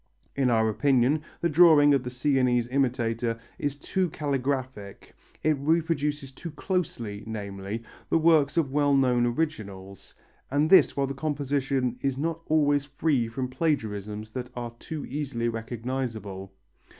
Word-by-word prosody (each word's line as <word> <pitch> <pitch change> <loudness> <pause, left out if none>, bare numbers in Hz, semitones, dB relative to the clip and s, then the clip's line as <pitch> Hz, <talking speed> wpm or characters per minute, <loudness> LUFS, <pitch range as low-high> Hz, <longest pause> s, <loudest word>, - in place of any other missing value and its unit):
In 135 -2 +2
our 110 -2 +3
opinion 135 +5 +2 0.2
the 170 - +2
drawing 150 -3 +6
of 135 -2 +2
the 125 - -4
Sienese 125 -2 +1
imitator 120 -3 0 0.2
is 145 -1 -2
too 185 +4 -1
caligraphic, 130 -8 -3 0.3
it 155 -1 +3
reproduces 150 -2 0
too 170 +6 -8
closely, 145 - -3
namely, 100 0 -5 0.3
the 165 - +3
forms 155 -3 +4
of 150 -5 +1
well 145 0 +3
known 125 -3 +3
originals, 100 - -4 0.3
and 145 +3 +2
this 190 - +6
while 140 - +2
the 135 - -4
composition 135 -3 -1
is 135 -2 -1
not 165 +3 -2
always 145 -2 +2
free 145 -4 0
from 130 +3 -3
plagiarisms 110 - -2
that 125 +1 -5
are 120 -1 -5
too 155 -2 -6
easily 135 -4 -3
recognizable. 115 -4 -4
135 Hz, 140 wpm, -27 LUFS, 115-145 Hz, 0.3 s, drawing